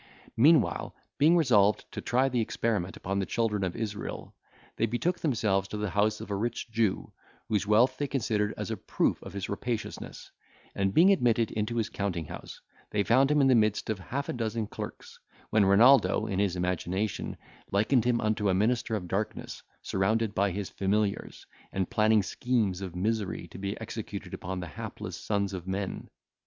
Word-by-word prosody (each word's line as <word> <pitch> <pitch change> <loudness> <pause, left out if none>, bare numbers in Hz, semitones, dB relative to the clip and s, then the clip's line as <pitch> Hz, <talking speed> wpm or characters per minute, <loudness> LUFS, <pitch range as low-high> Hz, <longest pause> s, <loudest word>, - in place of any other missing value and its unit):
Meanwhile, 150 +5 +3 0.2
being 160 +4 +6
resolved 105 -10 +4
to - - -5
try 130 +2 +2
the 125 -3 0
experiment 105 -4 -1
upon 95 +2 -2
the 95 - 0
children 105 -4 0
of 90 -2 -2
Israel, 105 -3 -5 0.4
they 115 - +2
betook 165 +11 -1
themselves 105 - +1
to 105 - -5
the 105 -2 -2
house 105 +2 +1
of 100 - -8
a - - 0
rich 115 +3 -3
Jew, 110 -4 0 0.3
whose 105 -1 0
wealth 120 +5 +4
they 145 - 0
considered 110 -6 0
as - - -4
a - - -2
proof - - 0
of - - -9
his 100 -1 -4
rapaciousness; 115 +2 -5 0.4
and, 95 -1 0
being 180 +5 +7
admitted 120 - +2
into 110 +2 -2
his 115 -2 0
counting 95 -6 -3
house, - - -9 0.3
they 105 -1 +1
found 130 +6 +4
him 150 -1 +4
in 135 - +5
the 130 - +5
midst 110 -2 +2
of 105 - -3
half 135 +9 -4
a - - -2
dozen 115 -2 -2
clerks, - - -8 0.3
when 110 -2 +4
Renaldo, 120 +8 +5
in 95 -2 -2
his 100 -3 +1
imagination, 90 +3 -2 0.3
likened 110 +5 +2
him 120 -1 +2
unto 105 -1 +1
a 95 - +3
minister 110 +2 +1
of 90 -4 -4
darkness 100 +4 -3 0.2
surrounded 110 +3 0
by 100 0 +2
his 100 +1 -3
familiars, 100 +1 -1 0.3
and 95 -2 -2
planning 110 -1 +4
schemes 105 -4 0
of 90 -3 -6
misery 105 +1 -2
to - - -10
be 100 0 -4
executed - - -6
upon 90 +1 -4
the - - -4
hapless 80 - -7
sons 100 -2 -1
of 90 -1 -6
men. 95 0 -4
105 Hz, 180 wpm, -29 LUFS, 100-115 Hz, 0.4 s, being